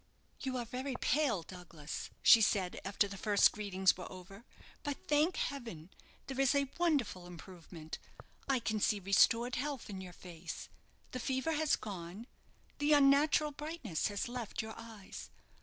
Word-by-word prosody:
"You 260 -2 -2
are 240 - -2
very 255 +3 -4
pale, 255 - +2
Douglas," 170 -4 -7
she 230 - +9
said 190 -4 +1
after 200 +1 +1
the 200 -1 -8
first 205 -2 +5
greetings 190 -3 +2
were 180 - -8
over. 195 +4 -11 0.4
"But, 290 -3 -3
thank 300 +5 +3
heaven, 225 - -4 0.3
there 270 0 -2
is 270 +1 +4
a 280 -1 +1
wonderful 275 - +1
improvement. 170 -2 -9 0.5
I 265 -3 +2
can 220 -1 -1
see 210 0 +2
restored 230 +5 +4
health 280 -4 -3
in 190 -1 -6
your 185 -1 -8
face. 170 -2 -8 0.4
The 255 - -4
fever 265 +5 -1
has 310 -1 +2
gone 190 +2 -7 0.5
the 295 +1 +4
unnatural 290 +1 +5
brightness 295 - -3
has 205 +1 -2
left 240 -3 -4
your 220 0 -6
eyes. 225 -4 -9
225 Hz, 155 wpm, -34 LUFS, 190-275 Hz, 0.5 s, she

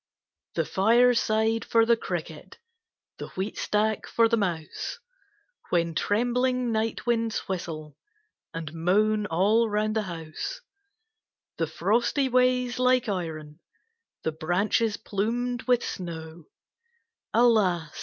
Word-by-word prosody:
The - - +1
fireside 225 +1 +3
for 230 -1 +3
the 235 0 +4
Cricket, 175 -4 -6 0.6
The - - -5
wheatstack 210 +2 -1
for 230 -1 +3
the 230 - +2
Mouse, 175 -7 -3 0.7
When 170 -1 +1
trembling 245 +6 +1
night 220 0 -1
winds 230 -2 0
whistle 155 -6 -5 0.6
And 160 -2 -6
moan 210 +6 +2
all 210 +7 +2
round 215 +1 0
the 220 - +2
house; 165 - -6 1.0
The 165 - +1
frosty 235 - +1
ways 250 0 +2
like 255 -1 +3
iron, 160 -6 -4 0.6
The 160 - 0
branches 190 +7 0
plumed 235 +4 -2
with 245 -1 +3
snow, 165 -2 -7 0.9
Alas! 195 -9 +3
215 Hz, 105 wpm, -26 LUFS, 170-235 Hz, 1.0 s, the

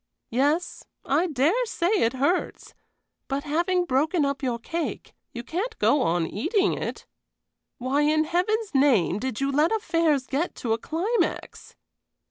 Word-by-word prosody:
"Yes, 290 +8 0 0.2
I 315 +7 +2
dare 320 - +2
say 350 -5 -1
it 255 - +2
hurts; 285 +8 -1 0.5
but 275 +1 -2
having 350 +4 0
broken 305 +3 +1
up 280 0 -2
your 250 -4 -1
cake, 330 +8 -5 0.2
you 235 - -7
can't 410 - -4
go 290 - +3
on 170 -3 +1
eating 380 - 0
it. - - -5 0.7
Why, 260 +4 0
in 310 +1 +3
Heaven's 390 +6 -1
name, 235 - +3
did 255 -2 -3
you 275 0 +1
let 300 +4 +2
affairs 330 -10 +1
get 285 +7 -2
to 225 -3 -1
a 225 - -1
climax?" 370 - -2
300 Hz, 145 wpm, -25 LUFS, 260-350 Hz, 0.7 s, go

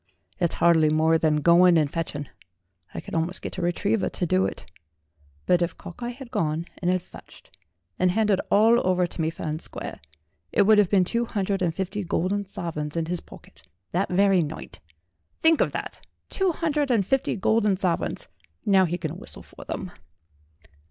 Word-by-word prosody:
It's 175 -3 +1
hardly 165 -3 +4
more 160 +1 +3
than 150 -2 +2
going 175 0 +6
and 155 -2 +3
fetching; 145 -2 -4 0.7
I - - -4
could - - -11
almost 165 +3 -2
get - - -5
a - - -2
retriever 195 +4 0
to 180 - -3
do 95 - +2
it. - - -8 0.8
But 180 -1 +3
if 170 -1 -1
Cockeye 240 +8 -7
had 250 0 -9
gone 155 +1 -1
and 175 - 0
had 185 -1 +1
fetched, - - -15 0.4
and 185 - +3
handed 205 0 +2
all 225 +4 +5
over 180 -1 +2
to 170 - -5
me 160 - +1
fair 165 - -7
and 155 +1 -3
square, - - -6 0.5
it 205 - +4
would 215 +1 +6
have 200 -4 +3
been 195 -3 +4
two 235 +6 -1
hundred 200 -3 -2
and 170 -3 0
fifty 195 +3 -3
golden 190 +3 -1
sovereigns 170 -6 -4
in 165 - 0
his 175 +1 -2
pocket - - -15 0.3
that 185 +3 0
very 195 0 +4
night. 150 - -6 0.6
Think 320 -1 +4
of - - +2
that - - -6 0.3
two 385 -2 +1
hundred 305 -4 -1
and 225 -6 +2
fifty 270 +6 0
golden 210 -1 +2
sovereigns. 180 -3 -1 0.4
Now 195 -3 +5
he 175 +1 -2
can 165 0 -5
whistle 240 - -9
for - - -13
them." 185 -3 -5
180 Hz, 185 wpm, -25 LUFS, 165-205 Hz, 0.8 s, going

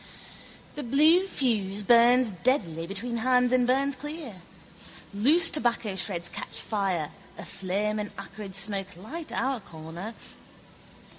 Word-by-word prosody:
The 295 - -5
blue 310 +9 +4
fuse 210 - 0
burns 240 +2 +5
deadly 175 - 0
between 230 +5 -2
hands 250 +1 +3
and 250 -1 +3
burns 270 +2 +2
clear. 285 - -7 0.7
Loose 295 +12 +4
tobaccoshreds 195 - -1
catch - - -3
fire: 190 -8 -2 0.3
a - - -8
flame 200 +3 -2
and 210 0 -3
acrid 200 0 -8
smoke 195 -2 -1
light 305 - -7
our 265 -1 -1
corner. 170 +4 -9
220 Hz, 120 wpm, -27 LUFS, 195-255 Hz, 0.7 s, burns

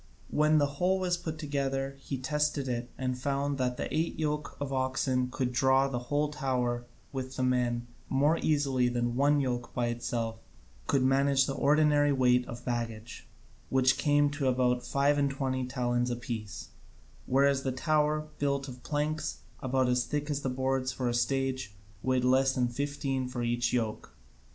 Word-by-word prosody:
When 155 +1 +4
the 145 - +4 0.2
whole 185 +1 +3
was 180 -1 +1
put 165 -2 -5
together 135 -2 -2
he 135 0 -4
tested 150 +1 0
it 120 -1 -3
and 130 -1 -1
found 140 0 -1
that 125 -1 0
the - - -2
eight 160 +2 0
yoke 150 -1 -2
of 140 -1 -3
oxen 130 -1 0
could 125 -1 -2
draw 130 +1 +4
the 130 -3 -2
whole 145 0 +1
tower 125 -4 -1 0.3
with 130 -1 -4
the 130 - -1
men 120 -2 +1 0.2
more 145 +5 +3
easily 135 -5 +2
than 120 0 -1
one 145 +2 +3
yoke 125 -3 -2
by 120 -1 +1
itself 115 -1 -2 0.5
could 135 -2 +2
manage 135 +1 +3
the 135 - -2
ordinary 145 0 +3
weight 125 -2 +3
of 120 +1 -8
baggage, 115 -1 -4 0.4
which 130 0 +3
came 145 -1 +3
to 140 -2 -1
about 125 -1 +2
five 140 +2 +2
and 140 -1 +2
twenty 130 -2 -2
talents 125 -1 0
apiece, 115 -3 -5 0.6
whereas 140 +1 +3
the 135 - -1
tower, 155 +2 +1
build 140 -1 0
of 125 -1 -9
planks 155 +1 -2 0.2
about 130 -1 +1
as 125 0 +2
thick 150 +2 -2
as 145 0 -1
the 135 - -1
boards 130 0 0
for 125 -2 -2
a - - -1
stage, 130 -3 -1 0.3
weighed 130 -1 +1
less 130 +1 +3
than 125 -2 +2
fifteen 135 0 -2
for 125 -1 -4
each 120 0 0
yoke. 115 -3 -2
130 Hz, 170 wpm, -30 LUFS, 125-145 Hz, 0.6 s, When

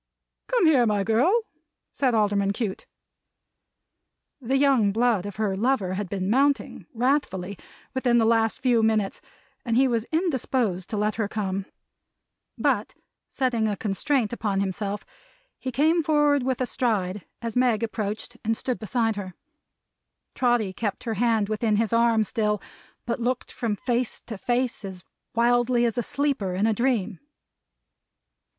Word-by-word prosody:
"Come - - +2
here, 270 -7 +5
my 205 -2 +1
girl!" 290 - +3 0.5
said 255 -4 +1
Alderman 200 -2 +2
Cute. 205 -3 -4 1.5
The 265 +2 +1
young 270 -7 +4
blood 220 -3 +1
of 205 - -7
her 210 -2 -1
lover 210 -3 +1
had 195 -1 -3
been 190 -1 -2
mounting, 275 +6 +1
wrathfully, 235 -7 0 0.4
within 250 -2 +2
the 225 - +4
last 225 -1 +2
few 245 -3 +3
minutes; 220 -3 +1 0.4
and 230 -1 0
he 265 +1 +5
was 235 -2 -1
indisposed 260 - 0
to 215 - -3
let 210 +1 0
her 220 -3 0
come. 195 -2 -3 0.9
But, - - 0 0.3
setting 240 -4 0
a 205 -2 -2
constraint 225 +3 0
upon 205 -4 -1
himself, 200 +1 -3 0.5
he 260 - -4
came 315 +7 +3
forward 295 -2 +3
with 260 0 -1
a - - +2
stride 205 -7 -1 0.2
as 230 0 -5
Meg 245 -3 +2
approached 220 +1 -4
and 225 0 0
stood 255 -2 -3
beside 225 -1 0
her. 185 -3 -6 1.0
Trotty 240 -6 +1
kept 205 0 -3
her 230 - -2
hand 220 -1 +2
within 215 0 0
his 225 +1 0
arm 230 -1 +4
still, 210 0 0 0.5
but 235 - -2
looked 250 +1 -1
from 225 -3 -2
face 240 +2 -1
to 220 -4 -8
face 245 +3 -1
as 190 -2 -7 0.3
wildly 240 +1 +3
as 230 -2 0
a 240 - 0
sleeper 255 -9 -1
in 200 +3 +1
a 225 - +3
dream. 225 -4 0
225 Hz, 150 wpm, -25 LUFS, 205-250 Hz, 1.5 s, here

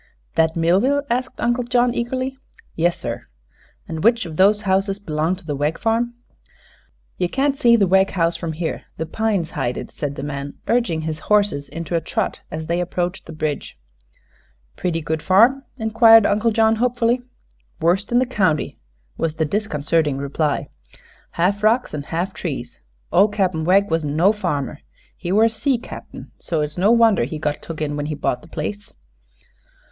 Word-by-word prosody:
"That 160 0 +2
Millville?" 195 +13 +2
asked 250 +2 -2
Uncle 240 +1 +1
John, 245 0 +2
eagerly. 255 +2 -2 0.4
"Yes, 170 +1 +1
sir." - - -5 0.6
"And 160 -1 -5
which 230 -2 +3
of 160 -2 -7
those 205 +4 +4
houses 195 0 +1
belongs 170 0 -2
to - - -20
the 150 -2 -2
Wegg 145 +3 -1
farm?" 235 +1 0 1.0
"Ye 180 - +2
can't 275 +7 0
see 240 -5 +5
the 210 -4 +4
Wegg 190 +1 +4
house 170 -2 +1
from 165 -2 -4
here; 160 0 -4
the 160 - -2
pines 195 -2 -1
hide 125 -4 -2
it," - - -7
said 145 -2 -4
the 135 - -6
man, 140 -1 -5
urging 230 -10 +1
his 155 0 -4
horses 205 -9 +2
into 165 +1 -4
a 165 - +1
trot - - -2
as 160 0 -5
they 170 +2 0
approached 180 +1 -3
the - - -8
bridge. 155 -2 -4 1.0
"Pretty 170 -2 -2
good 160 0 -2
farm?" 235 - +4
inquired 225 -1 +6
Uncle 210 +3 +2
John, 220 0 +3
hopefully. 245 0 +1 0.6
"Worst 185 +6 +1
in 240 - +3
the 255 - +4
county," 190 - 0 0.4
was 160 -1 -1
the 160 - 0
disconcerting 155 -5 0
reply. 140 +2 -1 0.6
"Half 190 +4 +1
rocks 230 +4 +2
an' 150 - -3
half 175 +4 -2
trees. 130 - -6 0.3
Ol' 195 +4 +5
Cap'n 185 -6 -1
Wegg 195 +1 +3
wasn't 155 -3 0
no 185 +7 +4
farmer. 150 -8 -3 0.4
He 175 -1 -5
were 210 +3 +4
a 225 - +5
sea 255 +4 0
cap'n; 235 - -10
so 165 -3 -2
it's 150 0 -2
no 195 +3 +4
wonder 230 - +5
he 155 +5 -5
got 150 -1 -2
took 160 -2 -5
in 145 -1 -2
when 145 0 -3
he 150 - -3
bought 130 -3 -1
the 160 - -15
place." 205 +7 -6
180 Hz, 175 wpm, -21 LUFS, 155-225 Hz, 1.0 s, inquired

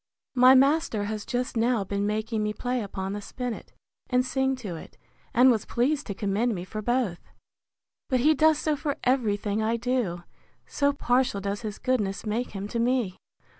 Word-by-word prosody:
My 255 0 +7
master 275 -5 +3
has 210 0 -4
just 250 +1 -2
now 230 -1 +2
been 200 +1 -2
making 215 +1 -1
me 210 0 -1
play 245 +2 -2
upon 195 -1 -4
the 205 - -4
spinnet, 245 +2 -6 0.4
and 250 0 +2
sing 265 0 0
to 210 -9 -6
it; 160 - -11 0.3
and 250 +2 +6
was 220 -4 0
pleased 280 +4 0
to 200 - -4
commend 210 +4 0
me 175 - -5
for 215 +3 -5
both. 240 -6 0 0.9
But 255 -2 +2
he 305 +4 +5
does 310 +1 +4
so 305 0 0
for 285 0 -3
every 245 -5 +2
thing 205 +1 -2
I 225 +2 +1
do, 230 -8 -1 0.4
so 285 0 +1
partial 250 -5 +1
does 200 +2 -3
his 215 -3 -5
goodness 210 -7 -1
make 225 +4 -1
him 200 0 -5
to 235 - -2
me. 235 -5 +1
235 Hz, 185 wpm, -26 LUFS, 205-255 Hz, 0.9 s, My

